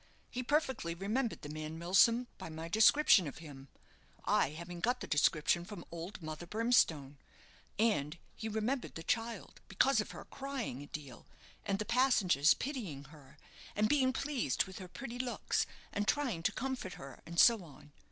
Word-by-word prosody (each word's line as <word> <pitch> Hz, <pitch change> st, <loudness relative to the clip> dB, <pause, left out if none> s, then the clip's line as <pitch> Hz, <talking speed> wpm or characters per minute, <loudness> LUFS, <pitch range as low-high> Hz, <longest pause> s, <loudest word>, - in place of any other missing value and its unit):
He 250 Hz, -, -3 dB
perfectly 260 Hz, -, 0 dB
remembered 220 Hz, +7 st, -2 dB
the 145 Hz, -, -6 dB
man 155 Hz, +1 st, -5 dB
Milsom 195 Hz, +8 st, +4 dB
by -, -, -7 dB
my 160 Hz, +1 st, -6 dB
description 215 Hz, -, +5 dB
of 140 Hz, -, -7 dB
him, 140 Hz, -4 st, -11 dB, 0.6 s
I -, -, +3 dB
having 170 Hz, +3 st, -8 dB
got 245 Hz, +7 st, +1 dB
the -, -, -5 dB
description 155 Hz, +3 st, +2 dB
from 185 Hz, -2 st, -9 dB
old 170 Hz, +3 st, -7 dB
Mother 155 Hz, +2 st, -6 dB
Brimstone; 165 Hz, -, +2 dB, 0.6 s
and 175 Hz, -8 st, +1 dB, 0.2 s
he 220 Hz, -, -5 dB
remembered 220 Hz, +5 st, -2 dB
the 165 Hz, -, -6 dB
child, 225 Hz, +1 st, -3 dB
because 230 Hz, +4 st, +3 dB
of -, -, -7 dB
her -, -, -9 dB
crying 270 Hz, -, -5 dB
a 145 Hz, -, -9 dB
deal, 140 Hz, -6 st, -9 dB, 0.4 s
and 195 Hz, -, -1 dB
the 215 Hz, -, -3 dB
passengers 210 Hz, -, +4 dB
pitying 215 Hz, -, -5 dB
her, 145 Hz, -4 st, -16 dB, 0.4 s
and 210 Hz, +1 st, +3 dB
being 260 Hz, 0 st, +3 dB
pleased 265 Hz, -, 0 dB
with 190 Hz, 0 st, -10 dB
her 185 Hz, -, -8 dB
pretty 245 Hz, +4 st, -7 dB
looks, 250 Hz, -1 st, -1 dB, 0.3 s
and 205 Hz, +1 st, -1 dB
trying 255 Hz, -, 0 dB
to 180 Hz, -, +1 dB
comfort 255 Hz, -6 st, -4 dB
her, 135 Hz, -1 st, -10 dB
and 170 Hz, 0 st, -2 dB
so 230 Hz, -5 st, +6 dB
on. 145 Hz, -2 st, -15 dB
195 Hz, 170 wpm, -34 LUFS, 160-245 Hz, 0.6 s, so